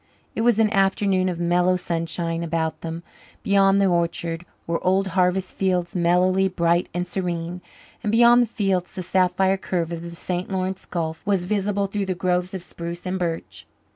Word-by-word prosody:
It - - -2
was 235 -2 +3
an 220 -1 +3
afternoon 195 -1 +2
of 175 -2 -4
mellow 175 +1 +2
sunshine; 165 -1 -2
about 160 -1 -2
them, 165 +1 -5 0.4
beyond 200 -2 +4
the 200 - +4
orchard, 170 -1 -1 0.2
were 170 0 -2
old 190 +1 +2
harvest 185 +1 +1
fields, 180 -2 0
mellowly 180 +2 +3
bright 170 -1 +1
and 180 +2 -3
serene, 175 -1 -3 0.4
and 210 - -1
beyond 235 +2 +6
the 240 - +2
fields 195 -5 -1
the 185 -1 -5
sapphire 190 +1 +2
curve 175 -3 -2
of 170 -1 -4
the 170 0 -8
St. 180 +1 -3
Lawrence 190 0 -3
Gulf 160 -2 -3
was 195 -3 +1
visible 200 0 0
through 195 0 -3
the 185 - -1
groves 180 +1 -1
of 185 - -5
spruce 170 0 -7
and 185 +1 -2
birch. 165 -2 -4
180 Hz, 175 wpm, -23 LUFS, 170-195 Hz, 0.4 s, beyond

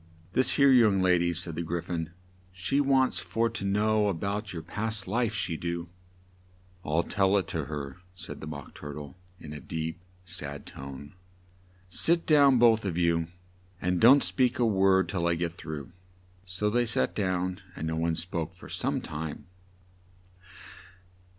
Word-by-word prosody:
"This 130 - +3
here 140 -1 +6
young 110 -6 +5
la 90 - +4
dy," 85 0 +1
said 85 -1 -2
the 80 - -3
Gry 85 +1 -2
phon, 80 -2 -4 0.4
"she 95 +11 0
wants 135 -2 +3
for 115 0 -1
to 115 - -4
know 105 +2 +2
a 100 - 0
bout 100 +4 -3
your 80 -2 -6
past 110 -2 -2
life, 115 +2 0
she 85 -7 -2
do." 85 0 -4 0.9
"I'll 80 +3 +1
tell 95 +2 +2
it 95 -4 -1
to 80 -3 -2
her," 75 0 -6 0.2
said 80 - -8
the 75 - -6
Mock 70 -3 -8
Tur 75 -1 -8
tle 75 0 -8 0.2
in 75 -1 -9
a 75 - -6
deep, 80 +3 -5 0.2
sad 75 -5 -5
tone: 70 +1 -9 0.7
"sit 165 - +2
down 140 -4 +6
both 115 -2 +5
of 90 -4 -2
you 85 -1 +2 0.5
and 90 0 0
don't 135 +5 +8
speak 125 -1 +1
a 120 - +3
word 95 -3 +3
till 85 -4 -1
I 85 - +2
get 85 0 -2
through." 80 -1 -7 0.5
So 95 +3 -1
they 120 +1 +2
sat 115 - +1
down, 95 -1 -1
and 80 - -4
no 80 0 -1
one 80 0 0
spoke 85 -1 -3
for - - -13
some - - -1
time. 80 0 -6
90 Hz, 170 wpm, -28 LUFS, 80-110 Hz, 0.9 s, don't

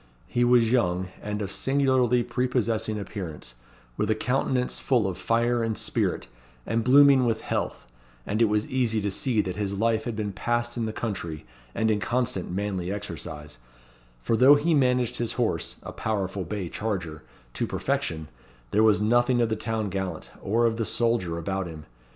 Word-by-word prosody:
He 120 - 0
was 120 -2 +4
young, 95 -7 +1
and 105 0 -3
of 100 - -4
singularly 130 -1 +2
prepossessing 115 -3 -1
appearance, 90 - -7 0.4
with - - 0
a 110 - +3
countenance 125 +2 0
full 120 -6 +2
of 95 -2 -2
fire 120 +3 +1
and 110 -1 -1
spirit, - - -1 0.4
and 115 0 0
blooming 135 +1 +7
with 115 -2 0
health, - - -3 0.4
and 110 +3 -1
it - - +7
was 105 +1 +1
easy 120 -4 +1
to 100 -1 -1
see 120 0 +1
that 95 -1 -5
his 100 -1 -2
life 110 +1 +1
had 120 - -3
been 105 -1 -2
passed 120 +3 -1
in 115 -2 -1
the - - -2
country, 90 -9 -4 0.3
and 110 0 +2
in 105 - +1
constant 120 -3 -1
manly 95 -1 -2
exercise; 75 -8 -7 0.6
for 115 - +1
though 130 +5 +7
he 155 +4 +2
managed 125 -4 +2
his 120 -1 -1
horse 120 -3 -1
a - - -6
powerful 95 -3 -2
bay 100 -4 -4
charger 85 -6 -4 0.3
to - - -2
perfection, 80 -1 -2 0.4
there 105 - +3
was 110 -2 +4
nothing 120 +3 +3
of 115 -1 +2
the 110 - 0
town 110 -1 -2
gallant, 95 -1 -4
or 115 +4 +1
of 115 -1 +1
the 115 - 0
soldier, 115 -8 0
about 95 +2 -2
him. 80 -2 -9
110 Hz, 175 wpm, -26 LUFS, 100-120 Hz, 0.6 s, blooming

